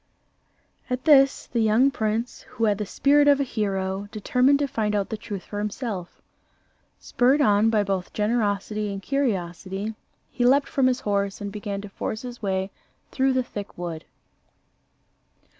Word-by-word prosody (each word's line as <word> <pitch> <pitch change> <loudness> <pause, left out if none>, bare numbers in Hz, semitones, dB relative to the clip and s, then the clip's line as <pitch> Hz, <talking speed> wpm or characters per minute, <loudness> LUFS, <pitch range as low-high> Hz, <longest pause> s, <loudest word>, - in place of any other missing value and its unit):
At 250 0 -2
this, 275 -3 +5
the 240 - -3
young 225 +5 +4
prince, 225 0 -2
who 230 - -3
had 210 -2 +2
the 210 - -3
spirit 290 +5 +3
of 285 -1 +5
a - - +2
hero, 195 -4 -2
determined 250 +6 +2
to 285 0 0
find 215 -4 -1
out 200 -1 -1
the 220 - -3
truth 205 -3 -7
for 205 - -6
himself. 210 -3 -5 0.8
Spurred 260 +4 +2
on 210 -5 +4
by 215 -2 +2
both 195 -2 -2
generosity 210 -1 -1
and 195 - -4
curiosity, 195 -5 -2 0.4
he 245 - -1
leaped 275 +3 +4
from 270 -2 +2
his 255 0 0
horse 200 -1 -1
and 200 -1 -5
began 200 -1 -5
to 205 - -9
force 215 +3 -5
his 245 -1 -8
way 190 -1 -1 0.4
through 265 0 +2
the 255 0 +1
thick 205 -4 -8
wood. 170 -2 -5
215 Hz, 160 wpm, -24 LUFS, 200-250 Hz, 0.8 s, this